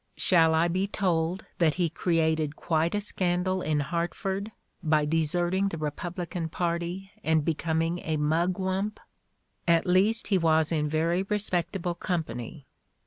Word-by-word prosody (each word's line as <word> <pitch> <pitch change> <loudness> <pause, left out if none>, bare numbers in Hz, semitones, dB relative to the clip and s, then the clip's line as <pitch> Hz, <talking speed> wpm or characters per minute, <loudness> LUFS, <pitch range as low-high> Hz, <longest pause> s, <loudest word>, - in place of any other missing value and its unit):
Shall 165 -3 +4
I 165 +2 +3
be 185 +3 0
told 180 -3 0
that 160 -4 +3
he 180 -2 +1
created 160 -2 0
quite 165 +2 0
a 205 - 0
scandal 185 -1 0
in 150 -3 0
Hartford 190 +6 -2 0.3
by 155 -3 +2
deserting 175 +5 +1
the 170 - -4
Republican 170 +2 -4
party 175 +3 -3
and 160 -2 +2
be 165 - +2
coming 165 +2 -1
a 160 -2 -2
Mugwump? 185 +6 0 0.7
At 170 -1 +4
least 195 +6 +2
he 195 -3 +3
was 160 -1 +3
in 150 -2 0
very 165 +4 +1
respect 195 -3 -1
able 175 -2 -1
company. 155 -7 -4
170 Hz, 140 wpm, -27 LUFS, 160-185 Hz, 0.7 s, Shall